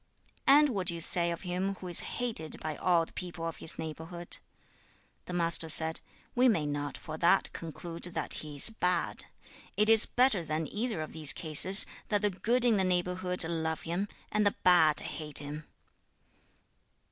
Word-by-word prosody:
'And 290 +2 +5
what 195 -7 -4
do 170 - +2
you - - -7
say 170 +1 +5
of 170 -1 -5
him 185 +1 -3
who 185 - -10
is 175 - +5
hated 225 -11 0
by 155 -1 -5
all 170 -1 +1
the - - -19
people 175 -2 -7
of 165 - -7
his 160 - -4
neighborhood?' 160 +2 -7 0.9
The 180 - -8
Master 170 -2 +4
said, 160 +1 0 0.3
'We 255 +1 +3
may 165 -10 0
not 145 0 -4
for 155 -1 -9
that 175 +3 +2
conclude 165 +1 -9
that 175 - -5
he 150 -1 -9
is 145 - +2
bad. 180 -5 -2 0.5
It 210 +1 +4
is 225 -1 +7
better 245 -8 +1
than 155 0 -4
either 215 -3 -4
of 155 - -11
these 155 -3 +3
cases 180 +5 +5 0.2
that 205 -1 -1
the 205 - +1
good 235 +6 0
in 230 -3 +3
the 190 - +1
neighborhood 180 0 +1
love 160 -1 -4
him, 175 +5 -3 0.2
and 210 0 0
the 205 - 0
bad 160 -4 +4
hate 150 -2 -1
him.' 150 +1 -5
175 Hz, 180 wpm, -29 LUFS, 160-195 Hz, 0.9 s, is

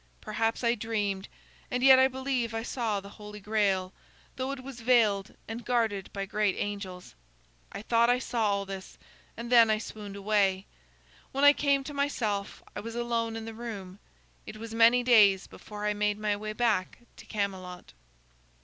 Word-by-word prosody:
Perhaps 225 +2 -2
I 235 0 +3
dreamed, 210 -4 -2 0.4
and 250 0 -1
yet 265 -1 +8
I 260 - +6
believe 260 -3 -2
I 225 - -2
saw 230 -4 -1
the 200 0 -11
Holy 210 0 -9
Grail, 195 -3 0 0.4
though 260 0 -3
it 275 -2 -6
was 260 -3 -9
veiled 220 -5 +2
and 225 +2 -6
guarded 220 -5 0
by 195 -1 -4
great 210 -1 0
angels. 200 -3 -5 0.6
I - - -7
thought 235 +1 +3
I 245 - +4
saw 235 -3 -1
all 200 0 0
this, 195 -1 -8 0.4
and 235 +1 -6
then 230 -2 +7
I 215 - +3
swooned 210 -2 -8
away. 200 -2 +1 0.7
When 275 +1 -1
I 285 0 +9
came 280 -2 +1
to 290 - -7
myself, 225 -8 -2
I - - -3
was 230 +2 -7
alone 230 -1 -1
in 225 0 -5
the 225 - -7
room. 205 -5 -7 0.5
It 215 - -8
was 225 +1 -8
many 230 +2 +5
days 210 -6 +5
before 210 0 -8
I 210 - +1
made 210 0 0
my 210 -1 0
way 215 +1 -5
back 215 -5 0 0.2
to - - -13
Camelot." 190 -4 -4
220 Hz, 175 wpm, -29 LUFS, 200-240 Hz, 0.7 s, I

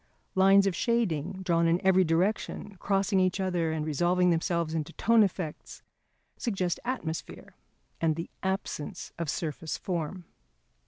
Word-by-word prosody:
Lines 195 +1 +6
of 195 -3 +1
shading 190 - 0
drawn 170 -2 +2
in 170 +1 +3
every 190 0 +5
direction, 185 +4 0
crossing 195 +1 +1
each 185 +1 +1
other 175 -4 0
and 155 -1 -2
resolving 175 +4 +2
themselves 170 -1 0
into 160 0 -3
tone 230 0 +4
effects, 180 -6 -2 0.5
suggest 190 -6 -1
atmosphere 205 -11 -5 0.5
and 160 -2 +2
the 165 +1 -6
absence 190 -2 -3
of 170 -3 -2
surface 160 -1 -3
form. 175 0 -4
180 Hz, 130 wpm, -29 LUFS, 165-195 Hz, 0.5 s, Lines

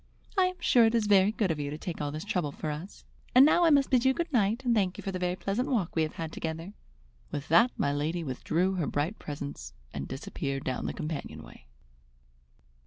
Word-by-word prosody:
"I 380 -2 +4
am 365 0 -1
sure 240 -2 +5
it 225 +1 +2
is 225 -2 +2
very 200 -1 +5
good 210 -5 0
of 155 - -3
you 145 -1 -2
to 150 - -5
take 165 0 -5
all 145 -1 -2
this 155 +4 -6
trouble 180 -8 -1
for 155 +2 -4
us. 160 +7 -8 0.3
And 260 +2 +9
now 340 +3 +5
I - - +6
must 280 -3 +4
bid 250 -2 +4
you 265 0 +3
good 335 -2 -3
night 230 +2 +1
and 240 - +3
thank 190 -5 +1
you - - -8
for 195 - -3
the 185 - -4
very 180 0 0
pleasant 200 +7 -2
walk 215 - 0
we 160 - +2
have 155 -1 -2
had 160 -1 -5
together." 165 +4 -5 0.6
With 145 -1 -5
that 225 +10 +6
my 140 - +1
lady 160 +4 -1
withdrew 165 +7 0
her 165 - 0
bright 155 +9 -2
presence 140 - -7 0.2
and 70 - -4
disappeared 135 +1 -4
down 130 - -2
the - - -3
companion 155 -1 -5
way. - - -15
180 Hz, 235 wpm, -29 LUFS, 150-225 Hz, 0.6 s, And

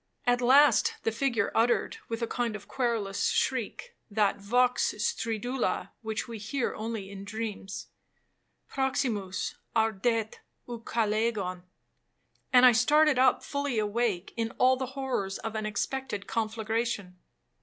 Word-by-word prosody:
At 245 0 +3
last 275 +4 +5
the 225 - +1
figure 230 -2 0
uttered, 235 +2 +2
with 230 0 -3
a - - 0
kind 235 -2 -2
of 205 -1 -9
querulous 230 -6 -1
shriek,—that 215 - -1
vox 245 +5 +2
stridula 230 +4 -1
which 220 0 -3
we 230 -2 -7
hear 235 +5 -2
only 215 -3 -5
in 195 -1 -8
dreams, 205 -2 -5 0.8
'Proximus 240 -8 -1 0.2
ardet 225 0 +1 0.3
Ucalegon,' 220 -5 -1 0.9
and 255 -1 +7
I 250 - +9
started 290 +4 +4
up 260 0 +4
fully 280 -4 -2
awake, 210 -3 0
in 225 -1 -1
all 255 +1 +5
the 260 0 -5
horrors 245 -8 -2
of 225 - -5
an 215 -1 -2
expected 215 0 -3
conflagration. 220 -4 -2
225 Hz, 125 wpm, -29 LUFS, 210-250 Hz, 0.9 s, I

